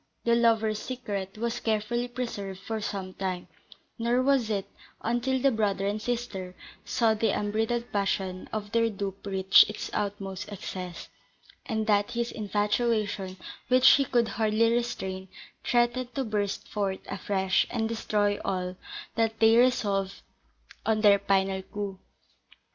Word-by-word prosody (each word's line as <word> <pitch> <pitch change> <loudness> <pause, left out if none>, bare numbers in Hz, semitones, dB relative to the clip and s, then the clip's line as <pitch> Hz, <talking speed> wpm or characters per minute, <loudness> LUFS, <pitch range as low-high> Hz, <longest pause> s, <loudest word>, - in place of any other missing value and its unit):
The 235 - +3
lovers' 225 -2 +3
secret 210 -6 -5
was 235 +2 -2
carefully 225 +2 0
preserved 220 -6 -5
for 220 +2 -4
some 190 -2 -4
time; 185 -2 -3 0.5
nor 240 +2 +2
was 265 -4 +3
it 200 -3 -1 0.4
until 240 +3 +1
the 275 +1 +4
brother 205 -4 0
and 205 +2 -1
sister 215 -7 -3 0.3
saw 225 -2 +2
the 220 +1 +1
unbridled 225 +3 -1
passion 190 -2 -1
of 210 -1 -4
their 230 0 +3
dupe 200 -2 -5
reach 190 -1 +6
its 210 - -5
utmost 200 0 -3
excess, 180 -3 -6 0.6
and 220 -3 -1
that 205 -2 +2
his 235 0 -1
infatuation, 210 -2 0 0.3
which 255 0 +7
he 275 - +5
could 240 -3 +2
hardly 225 +1 +2
restrain, 190 -6 -2 0.4
threatened 240 +1 +1
to 270 - 0
burst 210 -4 -2
forth 195 -2 -2
afresh, 190 -1 +1
and 225 -2 -1
destroy 210 -2 0
all, 185 -1 -2 0.4
that 225 -1 0
they 225 0 +6
resolved 200 -6 +2 0.6
on 220 -1 +1
their 205 -2 +6
final 195 -1 +1
coup. 195 0 -6
215 Hz, 135 wpm, -28 LUFS, 195-235 Hz, 0.6 s, which